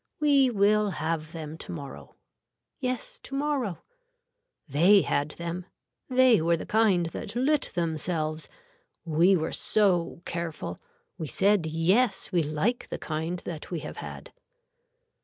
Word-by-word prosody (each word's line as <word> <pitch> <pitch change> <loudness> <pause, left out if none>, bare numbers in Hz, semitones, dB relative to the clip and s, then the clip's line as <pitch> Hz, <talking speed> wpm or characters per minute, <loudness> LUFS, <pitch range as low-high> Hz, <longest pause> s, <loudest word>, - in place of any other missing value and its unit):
We 280 -3 +5
will 210 -1 +3
have 160 -1 -2
them 160 -1 -7
to - - -6
morrow. 145 -5 -8 0.6
Yes 255 -2 -3
tomorrow. 275 - -2 0.8
They 175 +8 +5
had 145 +1 0
them. 170 +1 -5 0.4
They 255 -6 +5
were 170 +1 +2
the - - -6
kind 210 -6 +3
that 165 - -6
lit 285 +5 +2
themselves. 160 -1 -1 0.6
We 170 +4 +4
were 160 -2 -1
so 180 -5 +1
careful. 165 - -4 0.4
We 160 - -3
said 195 0 +2
yes 185 +11 +1
we 175 -3 +3
like 155 +11 -1
the - - -3
kind 160 +3 -3
that 160 -3 -6
we 170 -4 -3
have - - -7
had. - - -8
175 Hz, 130 wpm, -27 LUFS, 160-215 Hz, 0.8 s, We